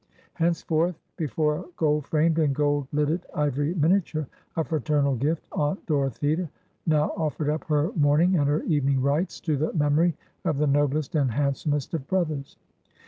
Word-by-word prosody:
Henceforth, 165 0 0 0.2
before 150 -1 0
a 185 - -8
gold 150 -2 +1
framed 160 +1 +2
and 145 -4 +2
gold 145 -1 +1
lidded 150 +4 0
ivory 145 +2 0
miniature, 160 -2 +1 0.3
a 160 - +2
fraternal 150 -3 +1
gift 150 +6 -1
aunt 150 +6 -1
Dorothea 150 +3 0 0.4
now 155 -2 +3
offered 155 -2 -1
up 155 - -3
her 150 +3 +1
morning 155 +4 +3
and 145 -4 +2
her 145 +2 +1
evening 140 -4 +1
rites, 145 +7 0
to 155 -3 0
the 155 +3 0
memory 155 +2 +2 0.3
of 160 -5 0
the 150 - +2
noblest 145 0 +1
and 145 -5 +2
handsomest 140 +3 -1
of 150 -5 -3
brothers. 155 -7 -2
150 Hz, 155 wpm, -26 LUFS, 145-160 Hz, 0.4 s, now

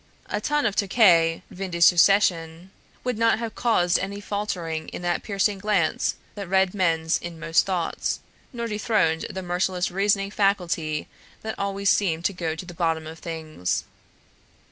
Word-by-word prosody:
A - - -1
tun 295 0 0
of 210 -3 0
Tokay 180 -6 +4
vin 190 +1 -5
de 170 -1 -4
succession 175 -1 +4 0.3
would 250 -3 -2
not 230 0 +4
have 225 -1 -4
caused 180 -7 +2
any 200 +1 -4
faltering 180 -6 -3
in - - -7
that 175 0 0
piercing 200 -1 0
glance 195 -6 +1 0.2
that 200 -2 -6
read 190 -1 +3
men's 165 -4 +1
inmost 165 0 0
thoughts, 180 -3 -1 0.3
nor 235 -2 -4
dethroned 210 -7 0
the 190 - -5
merciless 180 0 -1
reasoning 195 +1 +1
faculty 175 -7 0 0.4
that 220 0 -3
always 200 0 +1
seemed 170 -4 +1
to 200 - +1
go 165 -3 -3
to 170 - -7
the 175 - -9
bottom 165 -2 -1
of 160 +1 -9
things. 160 - -3
185 Hz, 155 wpm, -24 LUFS, 165-200 Hz, 0.4 s, Tokay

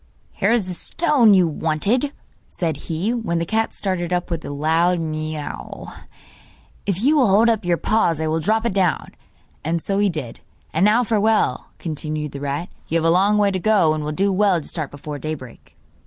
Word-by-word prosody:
'Here - - 0
is 230 -5 +1
the 185 - -2
stone 240 - +3
you 180 -2 +4
wanted,' 165 - 0 0.4
said 165 -4 -2
he, 175 +8 -1
when 225 -8 -2
the 165 - -1
cat 220 +5 0
started 180 -3 -3
up 180 0 -1
with 165 -2 -3
a - - -6
loud 160 +5 +1
mew; 155 -1 -5 1.0
'if 195 +1 -1
you 300 +4 +4
will 260 -5 +4
hold 210 +4 +4
up 225 -3 +1
your 175 -1 +1
paws 170 -7 +1
I 160 - -1
will 160 +1 0
drop 220 +7 +1
it 235 - 0
down.' 185 -3 0 0.5
And 165 +2 0
so 195 +4 -1
he 205 -1 +3
did. 150 -9 -5 0.3
'And 165 +5 +3
now 220 +4 +4
farewell,' 215 - +1
continued 155 -2 -4
the 140 - -7
rat; 145 +5 -3 0.2
'you 165 - +1
have 165 - 0
a 165 - +5
long 195 +4 +3
way 205 -1 +3
to 190 - -2
go, 195 -6 +3
and 155 -1 -3
will 150 - -3
do 195 +5 +1
well 195 -2 +3
to 155 - -7
start 155 -5 -4
before 145 +1 -7
daybreak. 140 -6 -8
175 Hz, 200 wpm, -21 LUFS, 155-210 Hz, 1.0 s, a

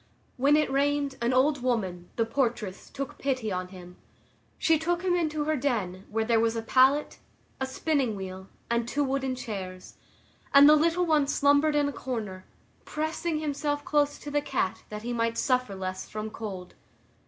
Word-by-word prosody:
When 280 +3 +4
it 300 -3 +2
rained, 285 0 +1
an 235 +1 +1
old 265 +2 +3
woman, 190 -8 -2
the 230 - +1
portress, 225 -5 -2
took 275 -2 -6
pity 255 -6 -1
on 180 0 -2
him; 180 -1 -12 0.6
she 325 -2 +3
took 345 +2 -1
him 365 -1 +2
into 310 -3 0
her 310 +1 0
den, 210 -9 -2
where 220 +1 -1
there 230 0 +3
was 225 0 +1
a 225 - -3
pallet, 265 +5 +3 0.4
a 265 - -1
spinning 265 -4 0
wheel, 190 -1 -7 0.2
and 235 0 0
two 290 +4 0
wooden 265 -1 -1
chairs, 190 -6 -7 0.6
and 280 +1 +10
the 305 - +8
little 335 +3 +2
one 305 -4 +3
slumbered 285 +2 +3
in 290 -1 +3
a 285 - -3
corner, 215 -9 -5 0.4
pressing 315 +1 -2
himself 290 -1 -2
close 290 -1 +1
to 290 - -8
the 290 0 +1
cat 265 -9 -2
that 210 0 -7
he 240 +1 -3
might 230 -1 0
suffer 255 -6 +1
less 185 0 -5
from 215 0 -5
cold. 195 -6 -7
260 Hz, 175 wpm, -28 LUFS, 215-290 Hz, 0.6 s, and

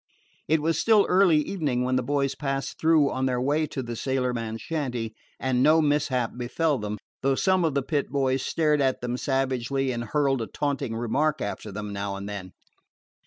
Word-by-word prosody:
It 155 -1 +2
was 165 +1 +1
still 220 -3 +5
early 180 -3 +5
evening 150 -6 -1
when 130 0 0
the 130 - +2
boys 140 +1 0
passed 135 -1 -3
through 160 -3 +4
on 130 0 0
their 125 -1 0
way 145 +4 +1
to 135 - -4
the 120 -1 -5
sailorman's 120 -3 -2
shanty, 125 -8 -3 0.3
and 130 -1 +1
no 155 +4 +5
mishap 145 -5 +1
befell 135 +4 0
them, 105 0 -4 0.2
though 135 0 +2
some 185 +4 +2
of 160 -4 0
the 140 - +1
Pit 145 0 -1
boys 135 -1 +1
stared 150 -3 +1
at 130 -1 +1
them 125 0 -2
savagely 135 0 0
and 120 -1 -3
hurled 135 +1 +1
a 115 - -3
taunting 140 -5 -2
remark 140 +7 0
after 105 -1 -4
them, 105 +1 -5
now 100 0 -3
and 100 +1 -6
then. 100 -3 -7
135 Hz, 190 wpm, -26 LUFS, 120-150 Hz, 0.3 s, still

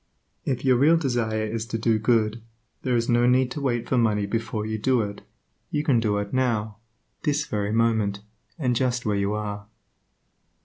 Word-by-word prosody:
If 130 -1 -2
your 130 -2 +5
real 155 +6 +5
desire 120 -7 0
is 110 +1 -4
to 115 - -2
do 110 -1 +1
good, 110 0 +1 0.4
there 125 -1 0
is 115 -1 +1
no 120 0 +3
need 125 0 +3
to 145 - -4
wait 120 -4 -1
for 130 - +2
money 105 -3 +2
before 110 0 -2
you 110 0 -3
do 125 +1 +2
it; 100 0 -6 0.5
you 150 - -1
can 135 -6 +3
do 105 -2 0
it 100 0 -4
now, 110 -5 0 0.4
this 150 -1 0
very 105 -4 -2
moment, 110 -3 +1 0.4
and 125 -6 0
just 125 0 0
where 105 -1 +1
you 100 +1 0
are. 105 -1 -4
115 Hz, 185 wpm, -25 LUFS, 105-125 Hz, 0.5 s, your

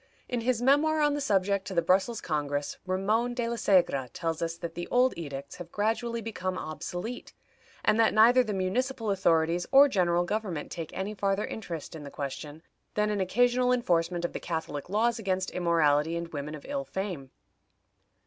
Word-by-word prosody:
In 245 -1 -2
his 245 0 0
memoir 300 +4 +4
on 295 -1 +3
the 290 - -2
subject 200 -5 +1
to 190 - -5
the 170 - +4
Brussels 190 +6 +2
Congress, 145 -2 -2
Ramon 215 +6 0
de 240 -2 -1
la 235 - -2
Segra 180 - +2
tells 165 -2 -3
us 165 0 -2
that 170 -1 -6
the 175 +1 -5
old 250 +1 +3
edicts 140 -3 -7
have 175 -2 -9
gradually 230 +2 -1
become 185 -4 -3
obsolete, 175 - -6 0.5
and 215 - +3
that 225 - +5
neither 240 +4 +6
the 215 - -4
municipal 225 +4 -1
authorities 170 -2 +2
or 280 +1 +8
general 175 -7 +2
government 185 -5 -3
take 165 -3 -5
any 195 +3 -3
farther 200 0 0
interest 170 -8 -6
in 160 - -7
the 140 - -7
question 145 +3 -6 0.3
than 210 0 +1
an 205 -2 0
occasional 245 +6 +2
enforcement 175 -7 +1
of - - -4
the - - -4
catholic 160 -3 -4
laws 225 +3 +1
against 190 -3 -1
immorality 165 -2 +2
and 170 0 -5
women 150 -1 -5
of 150 - -11
ill 280 -1 -2
fame. 190 - -5
190 Hz, 180 wpm, -28 LUFS, 165-230 Hz, 0.5 s, or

